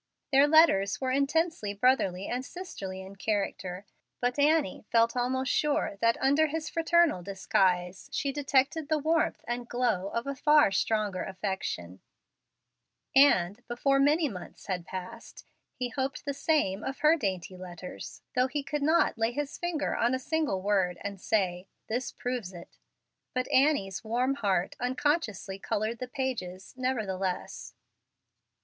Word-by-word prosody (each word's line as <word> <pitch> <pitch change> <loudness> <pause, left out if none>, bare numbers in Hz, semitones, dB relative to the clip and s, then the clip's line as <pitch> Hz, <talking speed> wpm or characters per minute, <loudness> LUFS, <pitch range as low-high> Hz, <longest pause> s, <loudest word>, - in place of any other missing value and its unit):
Their 275 +1 +6
letters 290 -11 +5
were 260 -1 -1
intensely 280 -5 0
brotherly 200 -5 +2
and 250 +1 -2
sisterly 195 - -7
in 195 +1 -11
character, 195 -2 -2 0.3
but 245 +3 -1
Annie 300 - +2
felt 230 +1 +3
almost 255 +1 0
sure 290 -9 0
that, 230 0 +3
under 285 +4 +3
his 315 +1 -4
fraternal 330 - +3
disguise, 185 -1 0
she 280 - -1
detected 285 +2 +1
the 310 - +3
warmth 315 +2 0
and 240 0 -4
glow 235 -6 0
of 235 +4 -3
a 280 - -2
far 295 -4 +4
stronger 205 -1 0
affection; 190 - -4 1.1
and, 230 -7 +5
before 275 +3 +1
many 300 +3 +3
months 185 -8 -9
had 180 -3 -3
passed, 185 -1 -8 0.3
he 250 -2 -3
hoped 265 +3 -3
the 285 - -1
same 270 -10 +1
of 270 0 -5
her 305 +2 +6
dainty 190 - -3
letters, 180 -1 -9
though 255 0 +3
he 280 +2 -3
could 295 +1 -3
not 310 -5 +2
lay 225 +1 +2
his 290 +3 -4
finger 345 -4 -2
on 240 +2 +2
a - - 0
single 270 - -1
word 190 -3 +1
and 200 -2 -6
say, 185 -4 0 0.2
"This 240 +2 -2
proves 245 -7 -4
it." 170 -1 -12 0.6
But 255 0 0
Annie's 260 -10 +2
warm 245 +4 +1
heart 195 -9 0
unconsciously 250 - -1
colored 215 +4 -2
the 255 - -4
pages, 230 -9 -4
nevertheless. 205 -8 -3
245 Hz, 145 wpm, -29 LUFS, 195-280 Hz, 1.1 s, Their